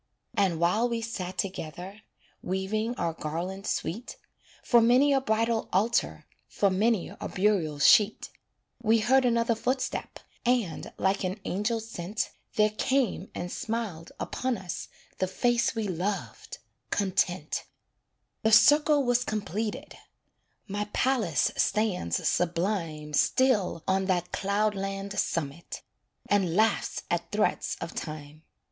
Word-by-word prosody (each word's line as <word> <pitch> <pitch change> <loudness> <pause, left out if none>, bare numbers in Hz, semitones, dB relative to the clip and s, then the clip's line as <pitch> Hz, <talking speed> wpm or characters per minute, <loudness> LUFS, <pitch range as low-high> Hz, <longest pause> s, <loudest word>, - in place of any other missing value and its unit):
And 195 -7 +1
while 210 +8 +2
we 235 -1 -1
sat 185 -5 -5
together, 190 +2 -5 0.4
Weaving 210 +5 -2
our 165 -7 -1
garland 175 +6 -4
sweet, 220 +9 -3 0.5
For 240 -2 +5
many 255 +5 +5
a 270 - +3
bridal 225 -1 0
altar, 220 +6 +1 0.2
For 200 -1 +1
many 210 +1 +1
a - - -7
burial 185 -7 +1
sheet, 210 +9 +4 0.5
We 225 0 +4
heard 255 +4 +3
another 235 -1 +2
footstep; 255 +4 -2 0.3
And, 240 -9 0
like 195 +1 +1
an 185 +3 -2
angel 210 +5 -1
sent, 215 -2 -4 0.2
There 210 0 +4
came 240 -3 0
and 175 0 -4
smiled 215 -8 -4
upon 255 -2 -2
us 180 -3 -6 0.3
The 185 - +1
face 240 +6 +1
we 220 -2 -1
loved 190 +3 -4 0.3
Content. 185 -4 0 0.8
The 220 - +2
circle 295 +4 +6
was 245 -1 +2
completed 215 -1 -4 0.7
My 205 +1 -2
palace 220 - +2
stands 190 - 0
sublime 165 -4 -1
Still 205 - +2
on 190 0 +2
that 180 -2 0
cloudland 200 0 -1
summit, 160 0 -3 0.4
And 190 -5 +2
laughs 220 +2 +1
at - - -1
threats - - 0
of - - -6
Time. 155 -1 -7
205 Hz, 120 wpm, -28 LUFS, 180-230 Hz, 0.8 s, circle